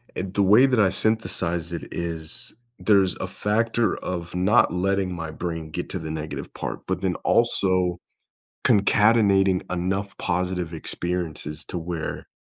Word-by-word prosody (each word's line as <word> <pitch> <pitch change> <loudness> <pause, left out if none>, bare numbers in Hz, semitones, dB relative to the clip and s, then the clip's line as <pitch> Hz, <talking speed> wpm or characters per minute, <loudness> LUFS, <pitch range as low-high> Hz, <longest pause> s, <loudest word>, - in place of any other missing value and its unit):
and 95 0 -4
the 100 - +2
way 105 +7 +7
that 130 -4 +2
I 100 -3 +5
synthesize 90 -5 0
it 85 - -6
is, 80 -2 -5 0.3
there's 100 -4 +3
a - - -4
factor 115 +4 0
of 85 -2 -5
not 95 +4 +4
letting 95 0 0
my 80 -2 -5
brain 80 -1 -5
get - - -4
to - - +1
the 80 - -6
negative 80 -1 -5
part, - - -4
but - - -1
then - - 0
also 90 -2 +2 0.6
concatenating 100 -2 +4
enough 95 +3 -2
positive 90 -1 -2
experiences 80 -2 -4
to 90 - -5
where 85 -1 -4
90 Hz, 145 wpm, -24 LUFS, 85-100 Hz, 0.6 s, way